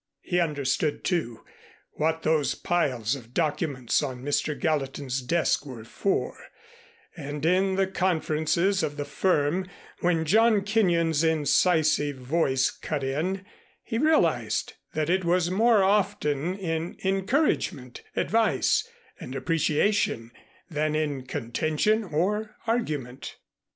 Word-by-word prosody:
He 180 Hz, -1 st, 0 dB
understood, 150 Hz, -2 st, 0 dB
too, 155 Hz, -, -2 dB, 0.5 s
what 160 Hz, +1 st, -1 dB
those 155 Hz, -2 st, +1 dB
piles 130 Hz, -9 st, 0 dB
of 125 Hz, -3 st, -9 dB
documents 145 Hz, -6 st, 0 dB
on 130 Hz, -4 st, -5 dB
Mr. 145 Hz, +1 st, -1 dB
Gallatin's 135 Hz, -4 st, -1 dB
desk 165 Hz, +5 st, +1 dB
were 130 Hz, -6 st, -9 dB
for, 195 Hz, -, -2 dB, 0.8 s
and 145 Hz, -2 st, -5 dB
in 190 Hz, +3 st, +2 dB
the 195 Hz, 0 st, +2 dB
conferences 180 Hz, 0 st, +1 dB
of 145 Hz, 0 st, -3 dB
the 145 Hz, -, -3 dB
firm, 165 Hz, +3 st, 0 dB, 0.3 s
when 170 Hz, -2 st, +1 dB
John 220 Hz, +4 st, +4 dB
Kenyon's 170 Hz, -7 st, +2 dB
incisive 155 Hz, -2 st, +2 dB
voice 130 Hz, 0 st, +1 dB
cut 150 Hz, -3 st, -4 dB
in, 175 Hz, +9 st, -2 dB, 0.4 s
he 225 Hz, -, -3 dB
realized 310 Hz, +2 st, +1 dB, 0.2 s
that 155 Hz, -1 st, 0 dB
it 185 Hz, +2 st, +1 dB
was 175 Hz, 0 st, +1 dB
more 220 Hz, +1 st, +4 dB
often 185 Hz, -4 st, +1 dB
in 165 Hz, -3 st, -3 dB
encouragement, 190 Hz, -, 0 dB
advice, 215 Hz, -, +1 dB, 0.3 s
and 130 Hz, -, -7 dB
appreciation, 160 Hz, -, 0 dB, 0.4 s
than 155 Hz, -2 st, -1 dB
in 145 Hz, -4 st, -2 dB
contention 155 Hz, -, 0 dB
or 205 Hz, +7 st, -1 dB
argument. 150 Hz, -, -3 dB
160 Hz, 115 wpm, -26 LUFS, 145-190 Hz, 0.8 s, John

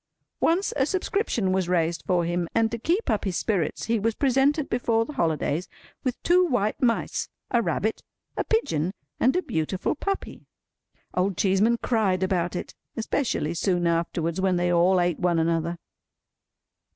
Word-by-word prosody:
Once 350 Hz, +5 st, +2 dB
a 265 Hz, -, +3 dB
subscription 375 Hz, -, 0 dB
was 185 Hz, -2 st, 0 dB
raised 170 Hz, -1 st, +1 dB
for 175 Hz, -2 st, +2 dB
him; 175 Hz, 0 st, -1 dB
and, 225 Hz, -1 st, +3 dB
to 235 Hz, -, -3 dB
keep 345 Hz, -, 0 dB
up 215 Hz, -4 st, +1 dB
his 190 Hz, -4 st, -1 dB
spirits, 185 Hz, -9 st, -1 dB
he 230 Hz, 0 st, +1 dB
was 225 Hz, +2 st, 0 dB
presented 275 Hz, +2 st, +2 dB
before 230 Hz, -2 st, +1 dB
the 300 Hz, -, -8 dB
holidays 160 Hz, -, 0 dB, 0.4 s
with 255 Hz, -3 st, -2 dB
two 360 Hz, +1 st, +5 dB
white 245 Hz, -, 0 dB
mice, 235 Hz, -3 st, 0 dB, 0.2 s
a 240 Hz, -, +3 dB
rabbit, 220 Hz, -1 st, -1 dB, 0.3 s
a -, -, 0 dB
pigeon, 185 Hz, -, 0 dB, 0.2 s
and 255 Hz, +6 st, +3 dB
a 365 Hz, -, +1 dB
beautiful 160 Hz, +4 st, -1 dB
puppy. 390 Hz, +6 st, -4 dB, 0.7 s
Old 185 Hz, 0 st, 0 dB
Cheeseman 210 Hz, +4 st, +3 dB
cried 200 Hz, -6 st, +1 dB
about 180 Hz, -2 st, 0 dB
it—especially 220 Hz, -, -3 dB
soon 175 Hz, 0 st, 0 dB
afterwards, 170 Hz, +1 st, 0 dB
when 190 Hz, -1 st, +2 dB
they 175 Hz, 0 st, +1 dB
all 180 Hz, +2 st, +4 dB
ate 175 Hz, -1 st, +1 dB
one 175 Hz, -2 st, +2 dB
another. 165 Hz, +1 st, 0 dB
190 Hz, 155 wpm, -25 LUFS, 175-240 Hz, 0.7 s, two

